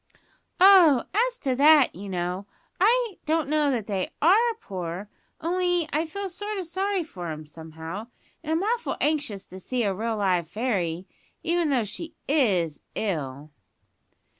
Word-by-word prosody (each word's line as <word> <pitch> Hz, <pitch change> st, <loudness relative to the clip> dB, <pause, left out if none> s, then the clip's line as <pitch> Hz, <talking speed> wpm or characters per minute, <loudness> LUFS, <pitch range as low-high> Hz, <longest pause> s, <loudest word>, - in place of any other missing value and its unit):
"Oh, 360 Hz, -9 st, +7 dB
as -, -, +1 dB
to 260 Hz, -2 st, 0 dB
that, 295 Hz, -1 st, +6 dB
you 200 Hz, +3 st, -8 dB
know, 180 Hz, +2 st, -3 dB, 0.3 s
I 455 Hz, +1 st, +2 dB
don't 315 Hz, -2 st, +1 dB
know 300 Hz, 0 st, +2 dB
that 240 Hz, -6 st, -1 dB
they 195 Hz, -3 st, -2 dB
are 445 Hz, +9 st, +4 dB
poor. 185 Hz, -, -6 dB, 0.3 s
Only 355 Hz, 0 st, 0 dB
I 315 Hz, +3 st, +1 dB
feel 400 Hz, +5 st, -4 dB
sort 410 Hz, +3 st, -5 dB
o' 380 Hz, -, -2 dB
sorry 380 Hz, +2 st, -1 dB
for 180 Hz, -, -8 dB
'em, 155 Hz, -1 st, -6 dB
somehow, 160 Hz, +6 st, -8 dB, 0.4 s
and 315 Hz, -, -4 dB
I'm 325 Hz, +3 st, +1 dB
awful 470 Hz, +3 st, -1 dB
anxious 290 Hz, -10 st, -1 dB
to 185 Hz, -, -11 dB
see 245 Hz, +5 st, -2 dB
a 200 Hz, -2 st, +1 dB
real 220 Hz, +3 st, -2 dB
live 180 Hz, -5 st, +1 dB
fairy, 190 Hz, -7 st, -2 dB, 0.4 s
even 340 Hz, -1 st, +1 dB
though 260 Hz, -5 st, +2 dB
she 315 Hz, -, -7 dB
is 195 Hz, -, +2 dB
ill." 150 Hz, -7 st, -3 dB
260 Hz, 155 wpm, -26 LUFS, -, 0.4 s, Oh